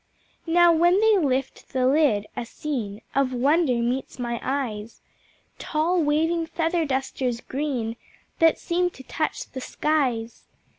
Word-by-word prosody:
Now, 345 +1 +5
when 345 +4 +4
they 435 -2 +4
lift 270 -4 -2
the 255 -1 +1
lid, 265 -7 +3
a - - -3
scene 230 -5 -5
Of 270 -2 +1
wonder 280 +2 +2
meets 250 +3 -2
my 240 -2 -3
eyes, 230 -5 -3 0.6
Tall 335 +3 0
waving 325 +3 +1
Feather 330 0 0
Dusters 265 -3 -2
green, 255 -5 -3 0.4
That 325 -1 +5
seem 355 +1 0
to 265 - -13
touch 310 +4 -3
the 260 - -6
skies. 250 -7 -1
275 Hz, 135 wpm, -24 LUFS, 250-325 Hz, 0.6 s, Now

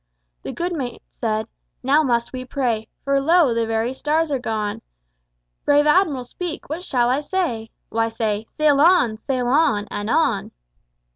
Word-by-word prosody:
The - - -5
good 350 +1 -3
mate 255 -7 -5
said: 220 -1 -2 0.4
"Now 280 +4 +4
must 235 -5 0
we 255 0 -4
pray, 245 -4 -2 0.2
For 275 0 +1
lo! 325 -3 +4
the 230 -1 0
very 225 +2 -1
stars 305 +3 0
are 275 - 0
gone. 215 -3 -3 0.8
Brave 290 0 +4
Admiral, 300 -5 +3
speak, 335 +6 -6
what 315 +4 -4
shall 250 -9 +1
I 255 +3 +2
say?" 295 -9 -2 0.2
"Why, 225 0 0
say 220 -1 -2
'Sail 295 -2 +2
on! 320 -10 +4
sail 255 +1 -2
on! 235 -7 +2
and 205 +1 -4
on!'" 245 -9 +1
255 Hz, 160 wpm, -22 LUFS, 225-300 Hz, 0.8 s, Now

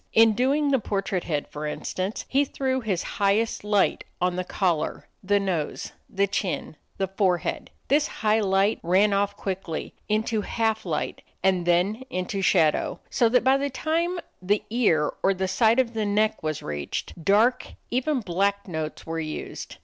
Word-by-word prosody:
In 225 0 +6
doing 280 +5 +2
the 270 - +3
portrait 195 -3 -2
head, 150 -4 -2
for 150 +1 -4
instance, 185 +6 -3
he 275 +2 +3
threw 265 -2 -1
his 195 -6 -1 0.2
highest 200 +3 +2
light 210 -2 +2 0.2
on 180 0 +1
the 185 - -1
collar, 180 -4 -1
the 205 +1 +2
nose, 180 -6 -2 0.2
the 195 +1 +1
chin, 190 -4 -3 0.2
the 195 - 0
forehead. 185 -3 0 0.2
This 295 +3 +3
high 215 0 +1
light 195 +1 +2
ran 195 +4 +3
off 200 0 0
quickly 190 -5 -4 0.2
into 215 +1 +1
half 220 +1 -1
light - - -2 0.2
and 185 -2 +2
then 180 +7 +2
into 185 +2 -2
shadow, 165 -5 +2
so 235 - +3
that 250 +2 +3
by 265 +2 +5
the 280 +1 -1
time 335 +6 -1 0.2
the 200 +3 +1
ear 170 -11 +2
or 195 -1 +2
side 220 +4 +3
of 250 -3 +2
the 215 -2 -1
neck 215 +2 +1
was 155 -2 -3
reached, 75 - -5
dark, 215 +7 +3 0.2
even 260 +2 +1
black, 200 +2 0
notes 160 -3 -4
were 165 0 -3
used. 155 -1 -6
200 Hz, 165 wpm, -25 LUFS, 180-225 Hz, 0.2 s, In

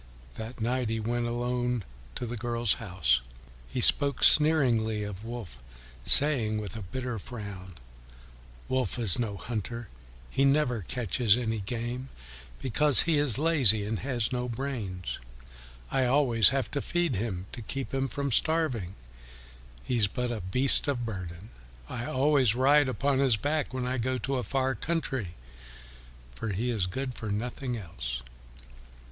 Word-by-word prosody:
That 110 - -8
night 120 +1 -1
he 115 0 -1
went 120 +2 -1
alone 120 -1 -1 0.3
to - - -3
the 120 +1 -5
girl's 120 -1 0
house. 80 -11 +1 0.5
He - - -3
spoke 140 -1 +3
sneeringly 120 -9 +5
of 105 0 -7
Wolf, 115 - -8 0.4
saying 125 -8 +6
with 105 -3 -5
a 110 - -6
bitter 125 +4 -5
frown, 100 -5 -9 0.9
"Wolf 130 -1 -1
is 115 -2 -1
no 105 -4 -2
hunter; 115 0 -5 0.4
he 135 - +1
never 135 -5 +2
catches 115 -1 +2
any 115 -3 -2
game 120 +5 -4 0.5
because 140 +2 +6
he 160 -3 +2
is 145 -5 +6
lazy 135 -10 +3
and 110 +1 -3
has 120 -4 -2
no 125 -1 -2
brains; 115 -8 -4 0.7
I 135 -1 +2
always 125 -5 +4
have 135 -1 -2
to 140 - -2
feed 175 - -1
him 95 -4 -3
to 120 - -7
keep 135 +5 -5
him 135 0 0
from 140 +2 -3
starving; 125 - 0 0.9
he 125 - -1
is 105 -3 +3
but 125 +4 -3
a 115 -3 -4
beast 125 +13 +2
of 125 -4 -1
burden; 95 -1 -7 0.4
I 120 - -5
always 135 -4 +2
ride 140 +2 +4
upon 135 +1 0
his 130 -5 +3
back 145 +5 -1
when 130 -1 -3
I 130 +1 -2
go 130 +2 -1
to 130 +3 -2
a 125 - -2
far 135 0 0
country, 130 - -3 1.0
for 110 - -5
he 120 +6 -1
is 100 -6 -1
good 130 +7 -4
for 110 -2 -6
nothing 120 +4 -3
else." 65 - -6
120 Hz, 150 wpm, -28 LUFS, 110-135 Hz, 1.0 s, saying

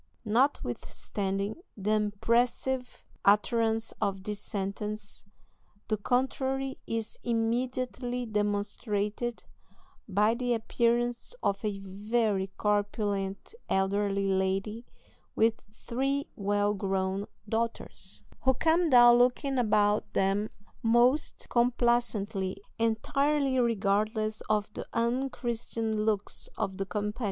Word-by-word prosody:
Notwithstanding 205 - -1 0.2
the 205 +1 -1
impressive 235 +5 0 0.2
utterance 225 +2 +3
of 195 -1 -1
this 210 0 -4
sentence 205 +1 -5 0.6
the 215 - +1
contrary 265 +4 0
is 225 -1 -3
immediately 245 +1 -1
demonstrated 210 +2 -1 0.7
by 210 +3 +3
the 245 0 0
appearance 240 - 0
of 200 +1 0
a 210 -2 -1
very 205 0 0
corpulent 205 - -1 0.2
elderly 195 +1 +1
lady 195 +4 0 0.5
with 225 0 +2
three 270 +6 -1
well 205 0 +1
grown 195 0 -1 0.2
daughters, 220 -3 -3 0.2
who 265 0 +3
come 330 +4 +3
down 240 -2 +8
looking 255 +2 +2
about 210 -2 +2
them 195 +2 +1 0.3
most 240 +6 +3
complacently, 235 -5 +1 0.2
entirely 270 +5 +2
regardless 215 -1 +1
of 210 -1 +1
the - - -6
unchristian 235 -2 -1
looks 210 -1 -1
of 195 -3 -2
the 195 - -2
company. 210 +4 -3
220 Hz, 95 wpm, -29 LUFS, 205-240 Hz, 0.7 s, down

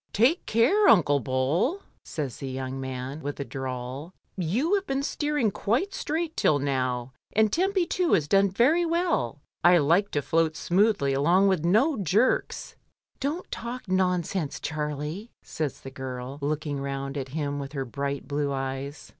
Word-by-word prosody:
"Take 255 - +3
care, 295 - +4
Unde 180 -8 +7 0.2
Bol," 150 - 0 0.2
says 145 -7 -4
the 135 - -5
young 130 0 -4
man, 130 +3 -5
with 145 0 -5
a 140 - -3
drawl, 130 +5 -5 0.2
"you 210 - 0
have 400 -1 +1
been 270 -2 -1
steering 295 -6 0
quite 250 - 0
straight 325 +1 -2
till 150 - +3
now, 130 -3 -1 0.2
and 215 -1 +3
Tempy 375 +1 +2
too 355 0 +1
has 150 -3 +3
done 195 +3 +4
very 265 - +3
well. 330 - 0 0.2
I 175 +1 +7
like 170 +7 +3
to 145 - 0
float 160 +1 +1
smoothly 185 -7 +2
along 175 +8 +4
with 185 -5 +1
no 235 - +3
jerks." 200 - +1 0.4
"Don't 300 +7 -3
talk 240 0 -5
nonsense, 180 -4 0
Charlie," 150 +7 -4
says 155 -3 -4
the 135 - -8
girl, 130 +1 -6
looking 150 0 -2
round 135 0 -4
at 135 -2 -4
him 145 -2 -2
with 140 0 -6
her 135 -2 -2
bright 140 +2 -4
blue 145 -1 -1
eyes. 135 +2 -4
160 Hz, 160 wpm, -26 LUFS, 140-230 Hz, 0.4 s, Unde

